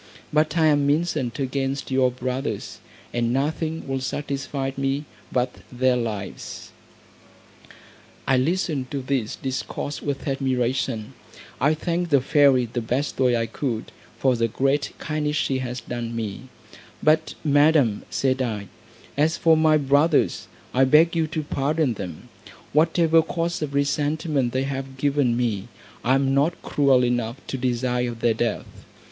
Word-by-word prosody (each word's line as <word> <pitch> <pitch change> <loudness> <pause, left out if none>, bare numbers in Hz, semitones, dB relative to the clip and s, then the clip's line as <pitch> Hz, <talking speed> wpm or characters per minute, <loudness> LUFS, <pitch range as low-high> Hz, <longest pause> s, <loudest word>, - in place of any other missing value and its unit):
But 155 +1 +2
I 160 - +4
am 145 -2 +3
incensed 150 -6 0
against 135 0 -2
your 130 -1 +3
brothers, 125 +1 -4 0.3
and 120 -1 0
nothing 155 +4 -1
will 135 0 -1
satisfy 135 0 -3
me 135 +2 -1 0.3
but 125 0 0
their 130 0 +2
lives." 110 -5 -5 1.6
I 135 - +4
listened 150 -2 0
to 140 -2 -4
this 130 -5 -1
discourse 135 +2 -4
with 140 0 -3
admiration; 130 -4 -1 0.5
I 150 +4 +3
thanked 170 +2 -2
the 140 -3 +5
fairy 135 -2 +4
the 120 +1 -3
best 125 +6 -2
way 125 -2 +3
I 115 - 0
could, 115 0 -4 0.3
for 130 -2 +2
the 115 0 +1
great 135 +5 0
kindness 150 -1 -2
she 135 -2 0
had 125 -1 -4
done 120 -1 -4
me; 115 +3 -5 0.5
"But, 155 +1 +3
Madam," 145 -6 +4
said 130 -1 0
I, 105 -5 -3 0.5
"as 155 +3 +2
for 165 -1 +5
my 155 -1 +4
brothers, 145 +2 +2 0.3
I 130 - +4
beg 155 +6 +5
you 160 -1 +1
to 155 0 -3
pardon 145 -1 0
them; 90 -7 -7 0.5
whatever 165 +1 +4
cause 170 +1 -2
of 145 -2 -3
resentment 145 -2 0
they 130 +2 0
have 135 -1 -5
given 140 -3 +1
me, 115 -4 -1 0.4
I 130 +2 +3
am 135 0 +2
not 145 +5 +2
cruel 135 -3 +3
enough 120 -1 -1
to - - -2
desire 125 -1 0
their 115 0 +1
death." 115 +1 -1
135 Hz, 145 wpm, -24 LUFS, 125-150 Hz, 1.6 s, the